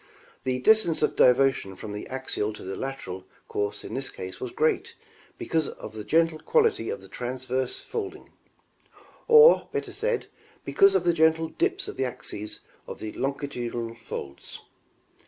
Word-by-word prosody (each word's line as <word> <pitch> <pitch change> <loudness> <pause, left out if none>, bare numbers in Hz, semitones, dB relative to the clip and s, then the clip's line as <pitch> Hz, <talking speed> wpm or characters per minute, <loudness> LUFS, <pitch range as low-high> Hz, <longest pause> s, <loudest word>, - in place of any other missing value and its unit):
The 130 -1 +1
distance 170 +1 +4
of - - +2
diversion 125 -6 +4
from 105 +1 -7
the 105 - -6
axial 130 -5 -2
to - - -10
the 95 +1 -4
lateral 95 -9 -5 0.2
course 105 0 -2
in - - -7
this 135 0 -3
case 95 0 -7
was 125 - -4
great 155 +6 0 0.4
because 160 -2 0
of 110 - -9
the 110 -1 -6
gentle 165 +7 +2
quality 455 - +2
of 475 - -4
the - - -13
transverse 130 +1 -3
folding; 410 -4 -6 1.0
or, 460 +1 +8
better - - -3
said, 460 +2 -1 0.4
because 395 -3 +5
of - - +3
the 175 - +3
gentle 160 0 +3
dips 375 +2 -1
of - - -7
the 130 - +1
axes 125 -4 -5 0.3
of - - -6
the 110 - -5
longi 140 +1 -2
tudinal 120 -3 -4
folds. 70 -11 -7
135 Hz, 160 wpm, -27 LUFS, 115-165 Hz, 1.0 s, or